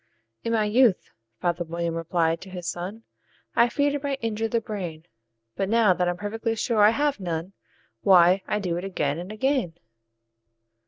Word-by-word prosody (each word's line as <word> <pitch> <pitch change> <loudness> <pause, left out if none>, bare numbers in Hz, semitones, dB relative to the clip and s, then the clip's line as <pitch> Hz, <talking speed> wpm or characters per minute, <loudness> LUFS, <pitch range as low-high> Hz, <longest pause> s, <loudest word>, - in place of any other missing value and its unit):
"In 230 - -2
my 220 -2 +2
youth," 220 -1 +3 0.3
father 175 0 0
William 170 0 -3
replied 165 0 0
to 190 - -10
his 180 -2 -7
son, 190 +6 -5 0.5
"I 235 +1 +5
feared 285 +3 +1
it 290 - -2
might 280 -1 -2
injure 225 0 -1
the 230 +1 0
brain; 175 -8 -6 0.5
But, 195 - -1
now 225 -4 +4
that 180 0 0
I'm 175 - -2
perfectly 225 +3 -2
sure 225 0 +1
I 205 - +8
have 285 +2 0
none, 175 0 -4 0.5
Why, 185 -1 +6
I - - 0
do 180 -5 -2
it 175 - -4
again 155 -6 -1
and 180 +4 -7
again." 225 - 0
195 Hz, 175 wpm, -25 LUFS, 175-225 Hz, 0.5 s, I